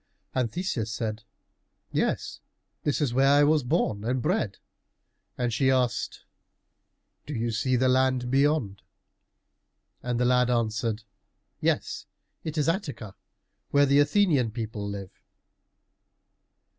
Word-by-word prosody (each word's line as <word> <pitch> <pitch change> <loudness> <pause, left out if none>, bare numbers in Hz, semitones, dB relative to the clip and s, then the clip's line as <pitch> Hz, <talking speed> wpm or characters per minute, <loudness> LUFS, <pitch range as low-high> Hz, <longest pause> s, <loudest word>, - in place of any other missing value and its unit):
And 125 -3 0
Theseus 155 - -2
said, 110 -1 -3 0.7
"Yes, - - -1 0.4
this 145 +1 0
is 135 -5 +1
where 135 +2 +4
I 145 +1 +6
was 150 +1 +4
born 105 -4 0
and 125 +3 0
bred." 150 - 0 0.8
And 120 -2 -1
she 130 +3 +2
asked, 125 -4 0 1.1
"Do 145 - -4
you 115 0 -1
see 125 +4 +1
the 130 +1 +3
land 130 -1 +2
beyond?" 135 -8 +1 1.2
And 120 -1 -2
the 125 - +2
lad 125 0 +3
answered, 115 -2 0 0.6
"Yes, - - -1 0.3
that 155 0 -5
is 150 - +1
Attica, 145 - -2 0.6
where 145 0 +4
the 140 +1 +4
Athenian 145 - +3
people 110 -2 -5
live!" 100 -2 -6
125 Hz, 120 wpm, -27 LUFS, 115-145 Hz, 1.2 s, I